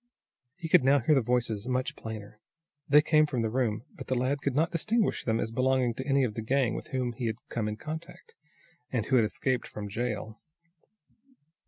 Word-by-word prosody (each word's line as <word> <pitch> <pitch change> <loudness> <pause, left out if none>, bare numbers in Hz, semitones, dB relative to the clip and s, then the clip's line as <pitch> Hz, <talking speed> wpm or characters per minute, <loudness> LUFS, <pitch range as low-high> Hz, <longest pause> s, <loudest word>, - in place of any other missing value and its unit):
He 165 - -6
could 155 - +5
now 135 +2 +5
hear 140 +4 +3
the 135 - +4
voices 115 -2 -1
much 130 +4 -1
plainer. 110 -1 -8 0.5
They 150 +1 +7
came 155 -1 +4
from 125 -5 -1
the 110 - -1
room, 115 -3 0
but - - -10
the 130 - 0
lad 130 +3 0
could 140 -3 -1
not 160 +4 +2
distinguish 215 +6 0
them 115 -1 0
as 110 - -2
belonging 130 0 +2
to 130 +4 -6
any 135 -1 +3
of 115 -4 -1
the 115 - -4
gang 125 +1 +1
with - - -5
whom 125 -2 -2
he 120 0 -3
had 110 - -1
come 110 -2 -2
in 105 0 -3
contact, 160 +6 -8 0.6
and 120 -4 0
who 130 - +1
had 115 - +4
escaped 125 +3 -1
from 105 -1 -7
jail. 110 0 -3
125 Hz, 205 wpm, -29 LUFS, 110-140 Hz, 0.6 s, They